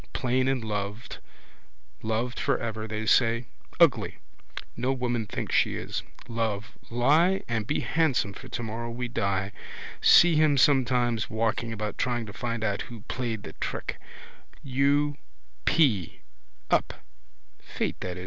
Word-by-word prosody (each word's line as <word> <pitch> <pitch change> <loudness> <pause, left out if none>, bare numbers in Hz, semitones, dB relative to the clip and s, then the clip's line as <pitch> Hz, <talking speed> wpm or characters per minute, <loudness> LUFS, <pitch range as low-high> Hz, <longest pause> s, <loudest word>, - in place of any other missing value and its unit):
Plain 130 +1 +1
and 135 -3 0
loved, 105 +1 -4 0.8
loved 115 +3 -2
for 135 -3 +1
ever, 110 -1 -4
they 110 0 -3
say. 115 +1 +3 0.3
Ugly: - - +4 0.6
no 130 - 0
woman 120 -4 -1
thinks - - -4
she - - +3
is. - - -4 0.3
Love, 115 -2 -2 0.2
lie 155 +11 +3
and 110 -3 -2
be 150 - 0
handsome 140 -11 +1
for 130 - -10
tomorrow 115 -1 -4
we 120 +1 -3
die. 100 -4 -1 0.5
See 175 -1 +7
him 150 -2 +4
sometimes 125 -6 +3
walking 115 +1 -1
about 105 -1 -4
trying 120 -2 0
to 105 - -9
find 115 -2 -3
out 100 -2 0
who 115 -3 -9
played 115 -2 -4
the 80 - -8
trick. - - -4 0.6
U. 140 +2 +2 0.5
p: 110 - +2 0.5
up. - - +2
120 Hz, 130 wpm, -27 LUFS, 110-130 Hz, 0.8 s, See